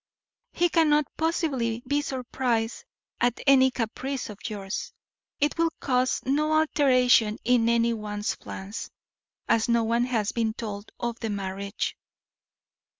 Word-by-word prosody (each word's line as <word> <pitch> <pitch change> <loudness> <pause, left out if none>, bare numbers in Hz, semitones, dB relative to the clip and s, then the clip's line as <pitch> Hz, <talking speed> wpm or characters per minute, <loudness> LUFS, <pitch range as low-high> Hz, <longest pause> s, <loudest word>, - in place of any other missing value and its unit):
He 350 - +2
cannot 300 -3 +3
possibly 270 -8 -1
be 285 +3 +1
surprised 250 -4 -2 0.3
at 245 -1 +1
any 265 -2 +6
caprice 255 +1 -3
of 205 - -12
yours. 205 -2 -5 0.5
It 295 +3 0
will 335 0 +4
cause 255 -1 +1
no 300 +4 +1
alteration 255 -8 +4
in 235 -2 +3
any 235 0 +3
one's 210 -1 -3
plans, 195 +3 -7 0.6
as 225 +1 +2
no 235 -1 +3
one 235 +2 +1
has 225 -5 0
been 225 -2 -1
told 205 -2 -6
of 235 -1 -3
the 225 - -3
marriage." 200 0 -3
240 Hz, 130 wpm, -26 LUFS, 220-270 Hz, 0.6 s, any